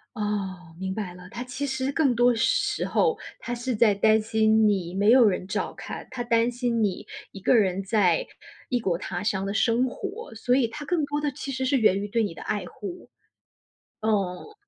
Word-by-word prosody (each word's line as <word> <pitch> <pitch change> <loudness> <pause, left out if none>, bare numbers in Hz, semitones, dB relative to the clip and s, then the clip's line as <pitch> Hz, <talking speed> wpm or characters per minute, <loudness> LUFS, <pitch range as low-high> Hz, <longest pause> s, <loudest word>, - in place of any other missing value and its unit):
哦， 190 -5 -4
明 190 0 -3
白 190 -4 -5
了， 180 0 -12
她 245 - -5
其 255 +3 -4
实 265 0 -1
更 280 -3 +2
多 240 +1 +4
时 400 - +1
候 465 -1 +2 0.2
她 240 - -5
是 240 +1 -2
在 215 -2 +4
担 215 +2 +4
心 220 0 +3
你 185 -4 0
没 200 +2 +2
有 245 -1 +7
人 185 -1 -1
照 - - -2
看， - - -8
她 255 -2 -4
担 235 0 +2
心 240 -2 0
你 195 -3 -2 0.2
一 195 - -9
个 195 - +3
人 195 -3 +2
在 190 -4 +2 0.4
异 245 - +1
国 190 -6 0
他 175 0 -4
乡 195 -2 0
的 200 - -2
生 235 +3 +2
活， 400 - -7
所 245 +3 +1
以 260 -3 +3
她 295 +6 -8
更 320 0 0
多 290 +1 -2
的 295 -1 -1
其 275 0 -6
实 260 0 -2
是 270 +1 +2
源 200 -4 +4
于 205 - -3
对 225 +2 +1
你 190 -6 -3
的 - - -9
爱 210 - -2
护。 350 - -9 0.9
嗯。 210 - -1
225 Hz, 220 characters per minute, -26 LUFS, 200-255 Hz, 0.9 s, 有